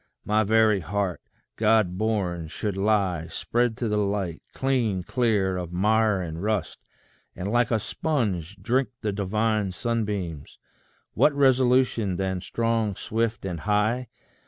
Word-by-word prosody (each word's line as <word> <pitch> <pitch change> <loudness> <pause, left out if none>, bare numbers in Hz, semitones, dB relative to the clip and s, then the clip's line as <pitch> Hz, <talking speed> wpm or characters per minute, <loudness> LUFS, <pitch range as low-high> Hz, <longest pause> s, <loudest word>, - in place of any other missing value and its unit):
my 110 +1 +2
very 110 -1 +4
heart, 95 0 -2 0.4
God 110 -4 +3
born, 95 -6 -1
should 100 +5 -3
lie 95 -5 +1
Spread 120 +7 -1
to 120 - -1
the 105 -1 +1
light, 100 -4 -1
clean, 120 -9 0
clear 105 -5 +1
of 90 -2 -5
mire 105 +1 +2
and 80 0 -6
rust, 105 -4 -1 0.6
And 95 +3 -4
like 120 -1 +2
a 115 - +2
sponge 105 - -2
drink 125 +7 +1
the 110 -2 -1
divine 105 +1 0
sunbeams. 95 -7 -3 0.6
What 150 - +4
resolution 130 -6 +3
then, 95 -1 -2
strong, 115 -1 0
swift, 115 +1 -2
and 90 -3 -3
high! 110 +6 +1
105 Hz, 135 wpm, -25 LUFS, 95-115 Hz, 0.6 s, very